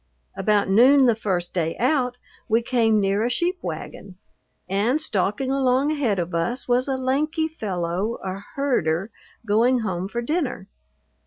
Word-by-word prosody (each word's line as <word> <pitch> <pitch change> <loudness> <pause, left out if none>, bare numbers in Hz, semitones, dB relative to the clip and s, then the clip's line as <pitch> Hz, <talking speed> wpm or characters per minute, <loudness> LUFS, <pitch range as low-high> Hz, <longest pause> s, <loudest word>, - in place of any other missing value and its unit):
About 205 +1 +1
noon 255 +8 +6
the 240 - +5
first 185 -5 -2
day 165 -3 -1
out 250 -1 +1 0.3
we 225 +2 +2
came 225 -3 +2
near 200 +1 +1
a 240 - +1
sheep 355 +8 -1
wagon, 190 -2 -7 0.5
and 210 +10 +1
stalking 220 -1 -1
along 270 +1 +2
ahead 260 -10 0
of 175 0 -3
us 170 +10 -2
was 250 +2 +2
a 265 -1 -1
lanky 300 +5 0
fellow, 195 - -3
a 190 0 -4 0.2
herder, 200 - 0 0.3
going 235 +4 +3
home 185 -3 -3
for 235 +4 -4
dinner. 280 - -2
230 Hz, 150 wpm, -23 LUFS, 195-265 Hz, 0.5 s, noon